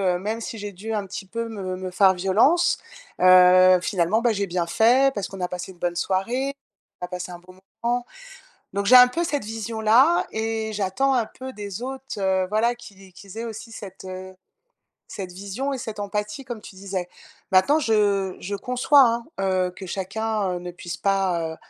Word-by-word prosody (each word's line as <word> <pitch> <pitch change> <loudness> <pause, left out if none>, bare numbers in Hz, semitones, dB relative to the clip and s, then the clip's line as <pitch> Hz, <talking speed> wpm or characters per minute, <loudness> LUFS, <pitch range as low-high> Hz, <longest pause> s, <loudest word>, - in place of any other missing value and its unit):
heu, - - -3
même 215 +4 -3
si 230 0 -6
j'ai 205 -1 -6
dû 210 +4 -6
un 205 -2 -2
petit 195 +1 -7
peu 230 +4 -4
me 190 -4 -5
me 185 0 -6
faire 190 +1 +5
violence, 205 - +3 0.4
heu, 185 0 +7
finalement, 190 +3 +1
bah, 240 0 +3
j'ai 200 -1 -2
bien 175 -1 -1
fait 250 +9 +4
parce 205 -5 -3
qu'on 195 -1 -8
a 180 - -1
passé 180 +1 -6
une 175 - -25
bonne 175 0 -2
soirée, 235 +10 -1 0.5
on - - -2
a - - -12
passé 180 0 -5
un 175 - -9
bon 185 +1 -17 0.2
moment, 240 +1 0 0.7
donc 200 0 -1
j'ai 255 +5 +8
un 250 0 +9
peu 330 +8 -2
cette 290 -9 -2
vision 225 +1 -5
là 250 +10 +4
et 220 0 -2
j'attends 210 +7 0
un 240 -3 +2
peu 260 +4 -9
des 205 -1 -7
autres 265 -2 -6
heu, 190 -1 +1
voilà, 225 +4 +1
qu'il 200 -5 -14
ais 190 -1 -15
qu'ils 195 +2 -12
aient 230 - -4
aussi 225 0 -8
cette 195 -4 -10
cette, 190 - -9
heu, 185 0 -8 0.7
cette 185 -3 -7
vision 200 +9 -4
et 270 - -3
cette 220 -4 -6
empathie, 210 +5 -4
comme 240 -3 -6
tu 205 - -12
disais. 190 -2 -4 0.4
Maintenant, 190 +12 +5
je 205 -7 +1
je 200 +2 -4
conçois, 250 +6 +4
hein, 235 -1 +2 0.2
heu, 185 -1 +1
que 190 - -8
chacun, 200 +2 -2
heu, - - -3
ne 175 0 -7
puisse 175 0 -7
pas, 190 -4 0
heu, - - -16
205 Hz, 205 wpm, -24 LUFS, 185-230 Hz, 0.7 s, un